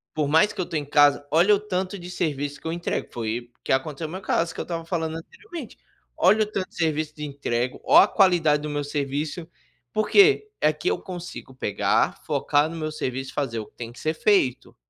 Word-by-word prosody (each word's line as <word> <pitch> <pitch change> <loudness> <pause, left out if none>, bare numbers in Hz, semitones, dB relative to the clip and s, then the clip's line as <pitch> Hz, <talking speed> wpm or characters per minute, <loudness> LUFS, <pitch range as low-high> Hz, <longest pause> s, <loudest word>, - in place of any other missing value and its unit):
"por 150 -2 0
mais 160 +8 +4
que 205 - -12
eu 180 - 0
estou 165 - -3
em 145 - -3
casa, 145 0 +4
olha 175 +7 +5
o - - -2
tanto 190 -1 -3
de 175 -1 -9
serviço 145 -4 -2
que 160 - -8
eu 160 - -1
entrego." 170 0 -3
Foi 120 +1 -4
o - - -53
que - - -2
aconteceu 145 +3 -1
no 155 - -9
meu 190 - -5
caso 165 -3 0
que - - -9
eu - - -1
estava 165 -1 -4
falando 160 -2 -2
anteriormente. 325 - -10 0.4
Olha 215 +3 +5
o - - -1
tanto 200 -3 -3
de - - -23
serviço 155 -2 -1
de 150 - -7
entrego, 130 -3 -2
olha - - +7
a - - -5
qualidade 170 -7 +3
do 150 - -4
meu 145 0 -2
serviço, 145 +3 -3 0.5
por 215 - 0
quê? 415 +1 +5
Aqui 155 +3 +1
eu - - -1
consigo 175 -7 -8
pegar, 105 -5 0
focar 145 +2 +1
no 165 - -7
meu 155 -1 -3
serviço 135 -2 -4
e - - -19
fazer 125 -6 -2
o 110 - -5
que - - -24
tem 115 -1 -7
que 120 - -14
ser 155 - -1
feito. 165 - +1
155 Hz, 235 wpm, -24 LUFS, 145-180 Hz, 0.5 s, olha